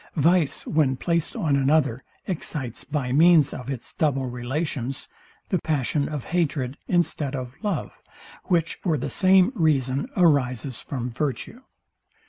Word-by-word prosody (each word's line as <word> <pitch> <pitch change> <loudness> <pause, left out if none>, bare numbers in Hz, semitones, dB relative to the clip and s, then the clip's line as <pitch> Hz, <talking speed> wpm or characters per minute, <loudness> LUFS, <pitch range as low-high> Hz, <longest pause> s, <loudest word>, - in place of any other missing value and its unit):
Vice, 165 0 +2
when 140 -4 +1
placed 170 +2 -1
on 160 -11 +1
another, 140 -2 +2 0.2
excites, 150 - -4
by 135 -3 -2
means 155 0 +5
of 125 +1 -7
its 130 -4 -5
double 135 -4 0
relations, 130 +1 -3 0.4
the 185 - +1
passion 145 -1 -1
of 150 -4 -4
hatred, 145 -7 0
instead 155 -5 0
of 125 -2 -5
love, 210 -2 -3 0.4
which 165 -3 +1
for 165 -5 +1
the 130 - -4
same 190 +2 +5
reason 145 - +1
arises 135 -7 +2
from 125 -3 -4
virtue. 145 - -4
145 Hz, 130 wpm, -24 LUFS, 130-165 Hz, 0.4 s, means